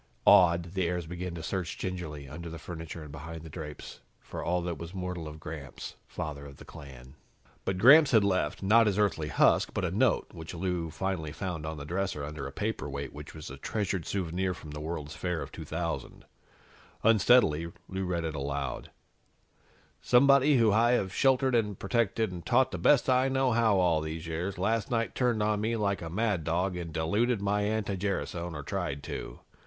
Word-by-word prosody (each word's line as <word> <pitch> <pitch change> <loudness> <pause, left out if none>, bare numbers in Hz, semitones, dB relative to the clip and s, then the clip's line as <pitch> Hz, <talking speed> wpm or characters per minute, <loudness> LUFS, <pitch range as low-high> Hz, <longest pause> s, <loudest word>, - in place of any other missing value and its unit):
Awed, 85 -1 +5
the 95 -3 0
heirs 90 -1 -2
began 90 +1 -5
to 80 - -6
search 90 -1 -3
gingerly, 80 -6 -5
under 85 +5 -7
the 85 - -7
furniture 80 0 -7
and 75 - -10
behind 80 +2 -8
the 80 - -10
drapes, 75 -2 -8 0.2
for - - -7
all 90 +1 +1
that 85 -4 -3
was 85 +3 -8
mortal 90 -3 -4
of 75 +1 -9
Gramps, 75 -3 -7
father 75 -2 -5
of 70 -1 -13
the - - -13
clan. 65 -2 -12 0.5
But 95 - -1
Gramps 140 +9 +8
had 110 -4 +5
left 95 -4 0
not 110 +3 +5
his 100 -2 +1
Earthly 100 -7 +1
husk 75 - +3
but - - 0
a - - -1
note, - - +2
which 80 +2 -8
Lou 90 -2 -2
finally 80 -1 -3
found 85 -5 -4
on 80 0 -4
the 70 - -7
dresser, 90 -2 -2
under 75 -1 -5
a - - -7
paperweight 70 -6 -4
which 75 +2 -10
was 75 -3 -8
a 70 - -8
treasured 95 +2 -2
souvenir 90 -1 -1
from 75 -3 -10
the 75 - -6
World's 75 -1 -5
Fair 90 -2 -2
of - - -6
2000. 85 +1 -5 0.8
Unsteadily, 105 -8 +4 0.2
Lou 95 0 -3
read 90 -2 -1
it 80 -1 -2
aloud: 70 -1 -3 1.1
"'Somebody 140 +2 +5
who 115 -3 +4
I 115 +3 +4
have 95 -5 0
sheltered 135 -1 +3
and 105 -5 +1
protected 110 0 0
and 90 -2 -7
taught 130 +1 +3
the 90 - -4
best 135 +10 +4
I 130 +1 +3
know 130 -1 +2
how 115 -3 +3
all 85 -4 +3
these 80 +1 -5
years 85 +4 -3
last 105 +3 0
night 115 -2 0
turned 120 -4 +1
on 105 -1 +1
me 115 +2 0
like 100 -3 0
a 85 - -5
mad 100 -1 0
dog 90 +4 0
and 85 -2 -5
diluted 100 +9 +1
my 100 +1 0
anti 105 -1 -1
gerasone, 90 -3 -3
or 75 - -5
tried 70 0 -3
to. - - -6
90 Hz, 195 wpm, -29 LUFS, 80-105 Hz, 1.1 s, Gramps